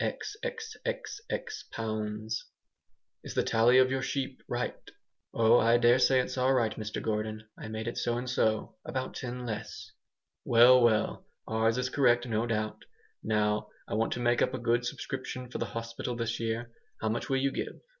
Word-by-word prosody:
xxxx 450 -1 -4
pounds 110 0 -3 0.8
"Is - - -7
the - - +3
tally 115 +3 +4
of 130 0 +5
your 130 0 0
sheep 135 -1 -3
right?" - - -1 0.6
"Oh! 115 +1 +5
I 115 +1 +5
daresay 125 +2 +5
it's 130 +1 -2
all 130 +1 +3
right, 115 -4 +1
Mr 110 -1 -4
Gordon, 110 0 -2
I - - -8
made 110 +1 -4
it 120 - -3
so 120 0 0
and 125 +1 -4
so; 110 -3 0
about 130 -1 -3
ten 125 0 -5
less." 110 -1 -6 0.5
"Well, 125 +2 +7
well! 110 -3 +2 0.2
Ours 110 +1 +2
is 125 0 0
correct, 120 -3 +3
no 115 0 0
doubt. 110 -2 -2 0.4
Now 105 -1 +1 0.2
I - - -5
want 110 +2 +1
to - - -4
make 120 0 +2
up 130 - +2
a - - -2
good 120 0 +1
subscription 125 0 -5
for - - -4
the 115 - -1
hospital 115 +1 -4
this 115 0 -2
year. 115 +1 -2 0.3
How 110 - -1
much 115 - -2
will 135 - +2
you 135 +1 +1
give? - - -4
120 Hz, 175 wpm, -30 LUFS, 110-130 Hz, 0.8 s, Well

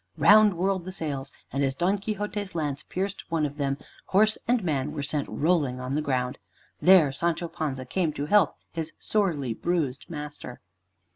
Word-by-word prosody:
Round 210 -2 +7
whirled 185 0 0
the 185 - -5
sails, 140 -6 -4 0.2
and 140 +1 +1
as 135 -1 0
Don 185 +6 +1
Quixote's 205 -1 -4
lance 145 -3 -2
pierced 195 +5 -4
one 160 -2 +1
of 145 0 -5
them, 140 -1 0 0.3
horse 215 +3 +3
and 240 -3 +2
man 150 -3 -1
were 145 -2 -3
sent 145 0 -2
rolling 150 -6 +1
on 130 +1 -4
the 150 - +1
ground. 130 -3 -1 0.4
There 180 -6 +7
Sancho 170 +4 -1
Panza 135 -5 -4
came 165 +4 0
to 145 - -3
help 205 +6 +4 0.2
his 165 -1 -4
sorely 160 - 0
bruised 155 -2 -2
master. 150 -5 -7
155 Hz, 170 wpm, -27 LUFS, 140-190 Hz, 0.4 s, Round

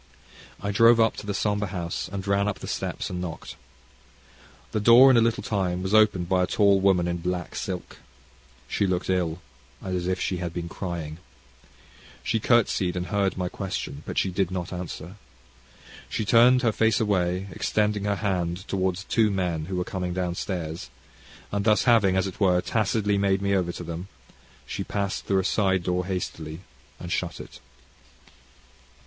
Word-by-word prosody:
I 100 +1 -2
drove 115 +3 +6
up 115 -1 +3
to - - -8
the 100 - -1
sombre 105 0 0
house, 85 -3 -4
and 100 -1 -5
ran 100 0 +1
up 105 - -2
the - - -8
steps, - - -3
and 90 -1 -3
knocked. 85 -2 -6 1.2
The 110 - 0
door, 120 +5 +8
in - - +4
a - - +6
little 115 0 +1
time, 95 -4 -1
was 95 +2 -2
opened 105 -5 +4
by 90 0 +2
a 90 - +1
tall 100 0 +4
woman 95 -3 +3
in 85 0 -1
black 90 +1 -4
silk. 90 -2 -5 0.7
She 100 - 0
looked 90 0 -1
ill, 90 -2 -1 0.4
and 95 -1 -4
as 90 -1 -2
if 95 0 0
she 90 - -1
had 85 -2 -5
been 85 -1 -3
crying. 85 -3 -5 1.0
She 115 - 0
curtseyed, 105 -6 +2
and 90 0 -2
heard 100 -2 +1
my 90 -1 -1
question, 90 -6 -5
but - - -5
she 95 - +1
did 95 0 0
not 90 -1 -4
answer. 90 +1 -7 0.9
She 105 - -2
turned 125 +4 +5
her 115 - +3
face 110 -1 +2
away, 95 -3 0
extending 105 0 0
her 100 0 +1
hand 95 -2 -2
towards 95 -1 -1
two 110 +1 +2
men 90 -5 -1
who 95 +2 -4
were 90 - 0
coming 90 -1 -4
down 90 -1 -1
stairs; 85 -3 -4 0.6
and 100 0 -1
thus 105 0 +3
having, 105 -6 +4
as 95 - +2
it 95 - -6
were, 90 -3 +4
tacitly 105 +1 0
made 100 -1 +2
me 100 0 +1
over 90 -3 +1
to - - -7
them, 85 +2 -6 0.6
she - - -4
passed 100 -1 -3
through 100 - +2
a - - -6
side 95 -3 +1
door 90 +1 -1
hastily 80 -3 -4 0.4
and - - -7
shut - - -2
it. - - -11
95 Hz, 180 wpm, -25 LUFS, 90-105 Hz, 1.2 s, door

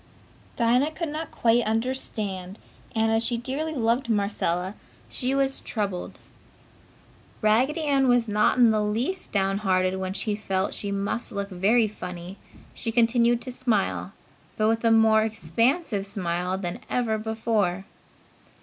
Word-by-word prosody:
Dinah 245 +5 +3
could 330 0 -3
not 310 +1 -4
quite 235 +1 +2
understand 215 -5 -2 0.4
and, 220 0 +2
as 225 +1 +2
she 235 0 -1
dearly 280 +7 -3
loved 235 0 +1
Marcella, 200 -3 0 0.4
she 260 +1 -1
was 275 0 +1
troubled. 200 -5 -3 1.3
Raggedy 250 +9 +3
Ann 275 -3 +2
was 245 -2 +3
not 210 +3 +2
in 240 -3 +6
the 215 -1 +1
least 235 - -1
downhearted 195 -2 +1
and 190 - -4
while 185 0 -3
she 210 +1 -2
felt 195 -2 -2
she 200 - -4
must 200 +5 -2
look 200 -2 -3
very 215 +5 +3
funny 180 -2 -8 0.4
she 225 - -4
continued 235 +1 +3
to 255 - -6
smile, 230 -6 -1 0.4
but 215 - +2
with 225 +1 0
a 230 - +4
more 220 -1 +5
expansive 220 - 0
smile 180 -1 -2
than 180 +2 -4
ever 225 -3 0
before. 215 -4 -1
220 Hz, 140 wpm, -25 LUFS, 195-240 Hz, 1.3 s, in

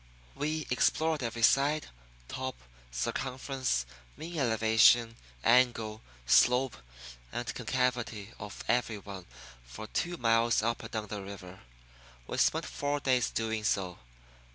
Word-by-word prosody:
We 155 +2 -2
explored 155 +4 +2
every 115 -1 -3
side, 145 +6 +3 0.4
top, 130 - -4 0.3
circumference, 130 - -2 0.3
mean 165 0 -5
elevation, 115 -1 +4 0.3
angle, 115 -3 +3 0.2
slope, 125 - +4 0.5
and 120 - -3
concavity 120 -4 -2
of 105 0 -8
every 120 -3 +1
one 100 -2 -9 0.4
for - - -9
two 175 +10 -2
miles 115 -2 +3
up 115 +1 0
and - - -8
down 110 -2 -3
the 105 -1 -4
river. 95 -2 -9 0.7
We - - -4
spent - - +2
four 145 0 -2
days 130 -3 +2
doing 110 -1 -2
so. 95 -4 -1
115 Hz, 120 wpm, -30 LUFS, 105-130 Hz, 0.7 s, elevation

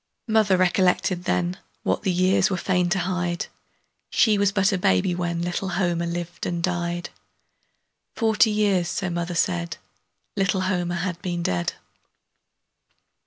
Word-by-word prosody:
Mother 215 -4 +3
recollected 180 0 +2
then 180 +1 0 0.2
What - - 0
the 195 - 0
years 185 +2 +3
were 190 - -1
fain 180 -1 +1
to 185 - +1
hide 180 -1 -1 0.6
She 220 -3 +4
was 200 -1 +2
but 195 +1 +2
a 195 - +1
baby 95 - +2
when 170 -1 -2
Little 175 +2 -2
Homer 175 -2 0
lived 175 0 -4
and 170 -1 -2
died; 175 -1 -2 1.0
Forty 220 -1 +3
years, 205 -4 +2
so 190 -2 -2
mother 170 0 -3
said, 175 -1 0 0.6
Little 195 -1 +1
Homer 175 -2 -1
had 175 0 -3
been 175 -1 -3
dead. 90 - -1
180 Hz, 140 wpm, -24 LUFS, 175-190 Hz, 1.0 s, She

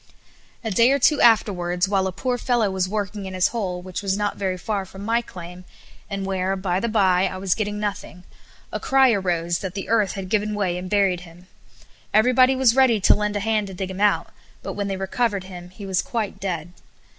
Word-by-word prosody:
A 225 - -2
day 230 +6 +4
or 275 - +3
two 285 +2 +3
afterwards, 180 -5 +3
while 190 -1 +1
a - - -2
poor 245 +6 -2
fellow 235 -6 +1
was 185 -1 -1
working 205 -1 -3
in 190 - -6
his 185 0 +3
hole, 185 -6 -3
which 185 +1 -5
was 195 -1 -1
not 205 -1 -1
very 190 -2 -2
far 200 +1 -2
from 190 +1 -10
my 230 +2 +2
claim, 180 -4 -10 0.5
and 195 -1 -3
where, 190 0 -1
by 185 -1 -1
the 235 - -1
bye, 190 -4 +3
I 185 - -6
was 185 -1 +1
getting 210 -1 -3
nothing, 200 -3 -5 0.5
a - - -3
cry 265 -1 +4
arose 175 -4 0
that 190 -1 -6
the 195 - -5
earth 215 -4 +2
had 195 -1 -6
given 210 0 0
way 190 -4 0
and 185 0 -7
buried 195 -3 +2
him. 175 0 -15 0.7
Everybody 255 +4 +5
was 260 -3 +3
ready 260 -5 +4
to 195 - +5
lend 210 0 -1
a 205 - -1
hand 215 -1 0
to 190 - -8
dig 190 +1 -4
him 190 +1 -6
out; 210 0 +2 0.3
but - - -4
when 205 -1 -3
they 195 -1 -3
recovered 200 +1 -1
him 180 -2 -10
he 195 +2 -10
was 190 -2 0
quite 225 -4 -4
dead. 175 -3 -4
195 Hz, 220 wpm, -23 LUFS, 185-215 Hz, 0.7 s, Everybody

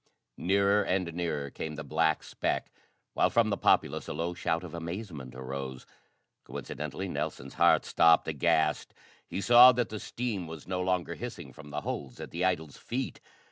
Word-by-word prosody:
Nearer 100 +2 +3
and 90 -3 -1
nearer 80 -5 -2
came 80 -1 -5
the 75 - -6
black 80 +2 +1
speck - - -2 0.4
while - - +3
from 115 -2 +3
the - - +2
populace - - +2
a - - -3
low 85 +3 -2
shout 85 -1 -1
of 90 - -8
amazement 85 - -6
arose. 65 0 -6 0.6
Coincidently 75 +6 -5
Nelson's - - -4
heart - - +4
stopped; 80 -1 +5
aghast, 75 -1 +1 0.3
he 100 - -4
saw 120 +5 +9
that 120 0 0
the 110 - -5
steam 110 -8 -3
was 80 -1 -9
no 90 -1 -1
longer 90 -1 0
hissing - - -7
from 75 -1 -12
the 75 +1 -4
holes 65 -4 -5
at - - -7
the 85 +2 -2
idol's 80 -6 0
feet! 130 +3 -4
85 Hz, 170 wpm, -30 LUFS, 75-95 Hz, 0.6 s, saw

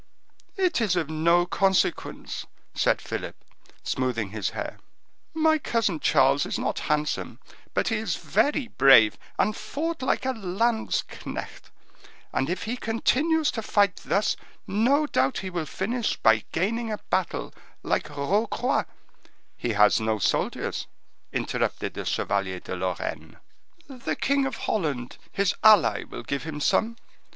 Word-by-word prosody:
"It 360 -8 +2
is 205 -5 +2
of 160 -3 -1
no 170 +3 +3
consequence," 190 +1 0 0.3
said - - +2
Philip, - - -5 0.5
smoothing 115 -6 -1
his 105 -3 -2
hair; - - -6 0.6
"my 315 0 +3
cousin 225 - 0
Charles 135 +1 +4
is - - -2
not - - -2
handsome, 150 0 -1 0.4
but - - +2
he 225 - +1
is 215 -5 -1
very 275 +5 +1
brave, 135 - +6 0.2
and 215 - +2
fought 325 +6 -4
like 260 - 0
a 260 - +1
landsknecht; 220 +2 -2 0.6
and 135 +3 0
if 180 - -2
he 235 +3 -3
continues 295 +8 +1
to 225 - -4
fight 205 -3 +2
thus, 205 +1 0 0.3
no 250 +10 +2
doubt 135 - +1
he 185 - -4
will 170 -3 -3
finish 225 - -1
by 110 -1 +4
gaining 225 +7 -1
a 210 - -2
battle, - - -1 0.3
like - - 0
Rocroi—" 200 - 0 0.7
"He 120 - -2
has 105 +2 +5
no 110 0 0
soldiers," 100 - -1 0.4
interrupted - - -2
the - - -5
Chevalier 95 -2 -1
de - - -6
Lorraine. 90 0 -4 0.5
"The 260 -4 -4
king 275 0 +1
of - - -4
Holland, 145 - -2
his 200 -1 +1
ally, 215 -5 +6
will - - -8
give 140 -1 -2
him 155 -2 -5
some. 225 +9 +1
195 Hz, 140 wpm, -26 LUFS, 140-235 Hz, 0.7 s, brave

